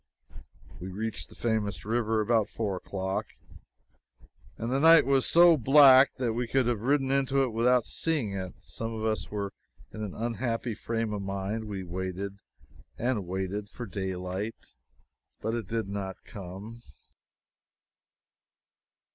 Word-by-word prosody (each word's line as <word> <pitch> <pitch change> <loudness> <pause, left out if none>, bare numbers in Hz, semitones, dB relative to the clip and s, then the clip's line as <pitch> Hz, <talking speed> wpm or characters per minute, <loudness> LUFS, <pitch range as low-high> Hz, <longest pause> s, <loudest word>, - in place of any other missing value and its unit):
We 90 - -6
reached 110 +4 -4
the - - -15
famous 110 -3 -1
river 110 -1 +1
before 110 -2 +2
four 100 -3 -2
o'clock, 95 +1 -3 1.3
and 115 +2 -3
the 135 - +2
night 165 +2 +7
was 135 -1 +3
so 170 -1 +7
black 135 +1 +7
that 125 -4 -1
we 120 +1 -2
could 130 +2 +2
have 120 -3 0
ridden 135 +2 +1
into 135 0 +2
it 130 - 0
without 120 +1 +3
seeing 150 -11 -1
it. 95 -2 -5
Some 115 0 -5
of 110 0 -3
us 110 -1 -1
were 100 -2 -4 0.4
in 110 - -6
an 105 -3 -5
unhappy 115 +1 -2
frame 115 0 -2
of 105 - -3
mind. 100 +3 -3
We 100 -3 -5
waited 95 +2 -5 0.6
and 115 -6 -1
waited 95 +3 -3
for 120 - -7
daylight, 95 +1 -5 0.7
but 110 - -2
it 115 -4 -3
did 115 0 -2
not 100 -1 -5
come. 100 +4 -9
110 Hz, 140 wpm, -28 LUFS, 100-120 Hz, 1.3 s, night